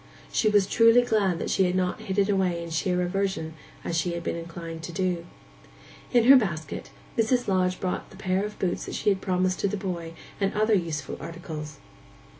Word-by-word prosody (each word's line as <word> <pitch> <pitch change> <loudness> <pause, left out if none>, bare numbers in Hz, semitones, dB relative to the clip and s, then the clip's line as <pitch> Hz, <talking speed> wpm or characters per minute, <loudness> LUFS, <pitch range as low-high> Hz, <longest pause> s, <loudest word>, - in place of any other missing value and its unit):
She 215 - +2
was 205 -2 +4
truly 230 +4 +5
glad 205 -7 +1
that - - -3
she 190 - +3
had 180 0 0
not 185 +3 0
hidden 200 -1 +1
away 180 -3 +1
in 170 - -7
sheer 180 +3 0
aversion, 180 -3 -1 0.3
as 170 - -2
she 170 +1 0
had 170 0 -4
been - - -2
inclined 165 -1 -7
to 170 - -6
do. 175 -2 -1 0.8
In 240 -2 +5
her 265 +4 +9
basket 155 - -3 0.3
Mrs. 245 +2 +2
Lodge 185 -1 +1
brought 185 -1 -3
the 190 - -14
pair 190 0 0
of 210 0 -5
boots 180 -2 -1
that - - -5
she - - +1
had 195 -2 +1
promised 185 -1 0
to - - +1
the 205 +1 -2
boy, 175 -4 -4 0.3
and 195 -1 0
other 215 +1 +3
useful 165 -7 -1
articles. 155 -2 -7
185 Hz, 200 wpm, -26 LUFS, 170-200 Hz, 0.8 s, her